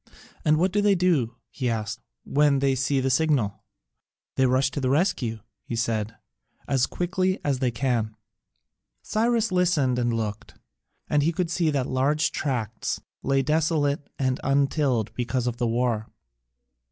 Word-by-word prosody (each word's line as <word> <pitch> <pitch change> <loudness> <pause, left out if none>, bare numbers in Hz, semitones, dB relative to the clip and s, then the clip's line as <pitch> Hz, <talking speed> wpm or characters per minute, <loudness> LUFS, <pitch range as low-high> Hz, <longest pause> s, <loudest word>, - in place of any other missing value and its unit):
"And 155 0 +4
what 180 +3 +2
do 205 - +2
they 205 -1 +4
do," 160 -11 +1 0.2
he 125 -3 -2
asked, 110 -2 -3 0.2
"when 145 0 +3
they 135 0 +2
see 135 +1 +1
the 130 0 0
signal?" 125 -8 +1 0.7
"They 130 - +3
rush 130 +2 +2
to 140 - -3
the 130 - +1
rescue," 135 - 0 0.2
he 115 - -5
said, 115 -2 -1 0.5
"as 135 -2 +2
quickly 185 +1 -1
as 140 -3 +1
they 130 -2 +1
can." 115 -2 -1 0.9
Cyrus 225 0 +1
listened 165 -9 +2
and 120 -1 +1
looked, 110 -2 -4 0.5
and 150 - +2
he 160 +4 +2
could 170 -1 -2
see 170 -2 +1
that 140 -4 0
large 145 +4 +1
tracts 115 -7 -2 0.2
lay 135 0 +1
desolate 150 -1 +1
and 130 -1 0
untilled 135 -5 +1
because 125 +1 -1
of 120 -1 -2
the 120 -1 0
war. 115 -2 0
135 Hz, 155 wpm, -25 LUFS, 120-155 Hz, 0.9 s, And